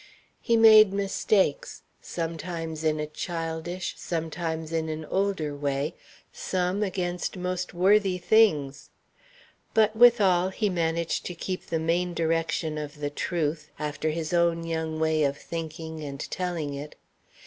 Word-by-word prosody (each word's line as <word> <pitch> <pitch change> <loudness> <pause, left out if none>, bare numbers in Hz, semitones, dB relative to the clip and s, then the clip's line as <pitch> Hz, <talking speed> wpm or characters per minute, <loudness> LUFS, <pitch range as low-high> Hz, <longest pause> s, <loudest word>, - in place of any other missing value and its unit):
He 230 - +2
made 215 -2 +8
mistakes, 200 -4 0 0.2
sometimes 165 -1 -4
in 155 -1 +1
a 150 - -1
childish, 165 +3 -4
sometimes 160 -1 -3
in 160 -1 -1
an 155 0 -4
older 185 -5 -1
way, 140 +1 -1 0.4
some 185 +2 -1
against 180 -2 -2
most 180 0 -3
worthy 190 +1 +3
things. 170 -8 +2 0.9
But 220 -1 +4
withal 205 -6 +5
he 210 +2 -1
managed 170 -2 -1
to 180 - -6
keep 185 +2 -5
the 165 - -1
main 170 +2 0
direction 165 -1 0
of 145 -1 -6 0.2
truth, 155 -2 -2
after 150 +1 -2
his 160 +1 -3
own 170 -1 +2
young 160 -1 -3
way 160 -1 +2
of 140 0 0
thinking 160 -1 -6
and 140 -1 -6
telling 175 -5 -2
it. 145 +2 -7
165 Hz, 130 wpm, -27 LUFS, 155-185 Hz, 0.9 s, made